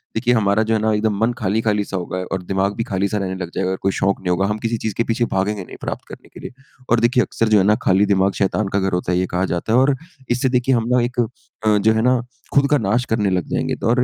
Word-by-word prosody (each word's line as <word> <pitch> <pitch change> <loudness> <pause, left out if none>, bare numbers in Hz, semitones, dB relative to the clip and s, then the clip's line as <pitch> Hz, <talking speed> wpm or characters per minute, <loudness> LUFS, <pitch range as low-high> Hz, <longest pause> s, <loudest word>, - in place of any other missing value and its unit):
देखिए 120 +2 +2
हमारा 110 -2 +2
जो 110 +1 0
है 110 - +2
ना 110 0 +2
एकदम 105 0 0
मन 115 +2 +2
खाली-खाली 105 +1 0
सा 95 - -4
होगा 90 0 -4
और 95 - -1
दिमाग़ 95 +2 0
भी 115 - -1
खाली-सा 100 +1 -1
रहने 95 -2 -2
लग 90 -2 -5
जाएगा 95 -1 0
अगर 95 - -2
कोई 95 - +1
शौक़ 100 +1 0
नहीं 90 - -3
होगा, 90 +2 +2
हम 105 +1 -1
किसी 115 +1 -1
चीज़ 110 -1 -3
के 115 - +2
पीछे 115 +1 0
भागेंगे 100 +1 -1
नहीं - - -11
प्राप्त - - -5
करने - - -12
के - - -11
लिए। - - -8 0.4
और 120 - +4
देखिए 120 +1 +3
अक्सर 115 - -1
जो 105 - +5
है 95 - +4
ना 105 +1 +4
खाली 95 +2 +4
दिमाग 100 -1 +2
शैतान 100 +1 +1
का 100 - +2
घर 95 -1 -1
होता 90 0 -1
है 90 - +2
ये 90 - +1
कहा 90 +2 0
जाता 90 +6 -2
है - - +5
और 135 +1 +3 0.4
इससे 125 +2 +1
देखिए 125 +1 +2
हम 115 -1 0
ना 125 - +4
एक 125 +1 -3
अ, 110 -2 -1
जो 110 +2 +3
है 110 - +1
ना 125 +1 +3 0.3
खुद 140 0 +4
का 150 - +5
नाश 115 +1 0
करने 105 -3 +1
लग 90 -4 0
जाएँगे। - - -1
तो - - -3
और 125 +1 +3
105 Hz, 290 wpm, -20 LUFS, 95-115 Hz, 0.4 s, जो